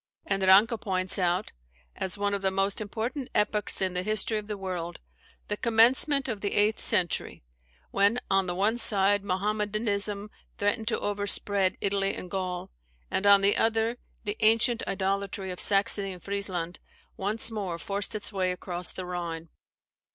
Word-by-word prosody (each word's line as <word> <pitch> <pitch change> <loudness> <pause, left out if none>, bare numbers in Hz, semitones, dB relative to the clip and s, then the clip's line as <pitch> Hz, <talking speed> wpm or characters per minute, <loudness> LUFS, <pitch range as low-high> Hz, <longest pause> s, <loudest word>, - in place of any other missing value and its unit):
] - - -46
and 195 -1 -1
Ranke 200 +4 +5
points 185 -1 -1
out, 180 +1 0 0.4
as 190 +1 -2
"one 205 0 0
of 200 - -2
the 190 - +2
most 195 +2 0
important 235 +6 -4
epochs 210 -2 +2
in 185 -1 0
the 180 - 0
history 215 +2 -1
of 210 - -10
the 210 -1 -4
world, 180 -3 -5 0.5
the 210 - -1
commencement 250 +6 +3
of 220 -5 -4
the 200 - -2
eighth 210 +1 +2
century; 175 - 0 0.5
when, 200 +5 +3
on 195 -1 +2
the 175 - -2
one 215 +5 +1
side, 200 -2 +4
Mahommedanism 205 +1 -1 0.3
threatened 210 +2 0
to 230 - +1
overspread 205 -1 0
Italy 195 0 +1
and 180 - -8
Gaul, 185 - -4 0.4
and 200 - 0
on 200 -1 +7
the 200 +1 +4
other, 225 +1 +1 0.2
the 210 -1 -3
ancient 225 +2 +3
idolatry 195 0 -2
of 180 - -7
Saxony 195 -1 +2
and 180 - -13
Friesland 185 -4 -3 0.4
once 215 +4 0
more 195 -6 -3
forced 200 +5 -1
its 210 +1 -3
way 185 -2 0
across 180 -1 -1
the 185 - -6
Rhine. 170 -2 -5
200 Hz, 165 wpm, -27 LUFS, 190-215 Hz, 0.5 s, on